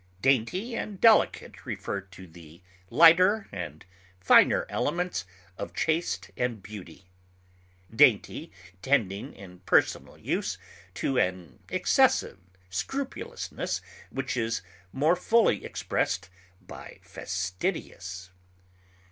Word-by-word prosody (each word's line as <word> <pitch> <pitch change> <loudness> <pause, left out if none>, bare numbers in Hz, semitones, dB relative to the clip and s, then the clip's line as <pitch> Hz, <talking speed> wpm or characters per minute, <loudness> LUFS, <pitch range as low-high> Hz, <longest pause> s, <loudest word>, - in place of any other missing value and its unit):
Dainty 135 - +1
and 205 -4 -5
delicate 225 -2 +3
refer 100 - -4
to 95 -1 -14
the 85 -1 -15 0.3
lighter 185 +6 +6
and 85 -5 -7 0.3
finer 90 - +5
elements 180 - -2 0.3
of 85 - -6
taste 160 - -1
and 120 -5 -2
beauty, 95 -4 -10 0.9
dainty - - +3 0.3
tending 105 -7 0
in 90 -2 -13
personal 90 - +1
use - - -2 0.4
to 130 +7 0
an 90 - -2
excessive - - +2 0.3
scrupulousness 280 - -4 0.3
which 135 -1 -3
is 115 -4 -1 0.3
more 155 +6 +3
fully 215 - +2
expressed - - -2 0.3
by - - -11
fastidious. 90 -1 -4
110 Hz, 95 wpm, -27 LUFS, -, 0.9 s, lighter